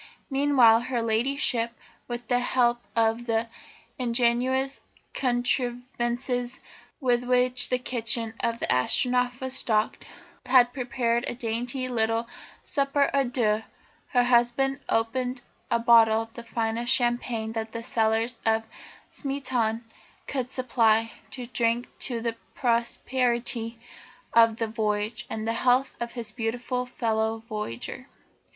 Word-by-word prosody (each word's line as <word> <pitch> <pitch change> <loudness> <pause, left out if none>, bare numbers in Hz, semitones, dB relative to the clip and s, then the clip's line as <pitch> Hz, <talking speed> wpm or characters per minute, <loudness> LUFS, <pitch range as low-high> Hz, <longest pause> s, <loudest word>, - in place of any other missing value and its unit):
Meanwhile, 270 -5 +5
her 240 -3 0
Ladyship, 235 0 +1 0.3
with 240 -1 -6
the 245 +1 +2
help 240 -1 +2
of 230 +1 +1
the 225 0 +1 0.5
ingenious 250 +2 +1 0.3
contrivances 245 0 -1 0.4
with 245 -3 +2
which 250 0 +2
the 250 - +2
kitchen 230 -2 -1
of 230 0 -1
the - - -2
Astronef 245 - +2
was 260 -1 -3
stocked, 215 -2 +1 0.4
had 250 -1 +5
prepared 240 -2 0
a - - -3
dainty 245 +2 -2
little 225 -1 0 0.4
souper 280 0 +1
à 275 -3 +1
deux. 220 -4 +1 0.5
Her 245 -1 +3
husband 250 +3 +2
opened 245 +2 -1 0.3
a - - +3
bottle 225 -1 +5
of 225 0 -16
the 235 - -8
finest 230 +1 -1
champagne 240 -3 0
that 225 -1 -4
the 230 0 -6
cellars 225 0 0
of 225 0 +2 0.4
Smeaton 250 -5 -2 0.4
could 255 -3 -3
supply, 230 -4 +2 0.2
to 250 -2 -6
drink 235 0 0
to 235 -3 -2
the 230 0 -2 0.2
prosperity 235 -1 0 0.6
of 230 -1 +5
the 230 - 0
voyage, 215 -1 -2
and 220 0 -4
the 225 - +1
health 255 +2 +3
of 235 0 -4
his 230 -3 -5
beautiful 245 +2 -2
fellow 220 -2 -1
voyager. 210 - -5
240 Hz, 125 wpm, -26 LUFS, 225-250 Hz, 0.6 s, Meanwhile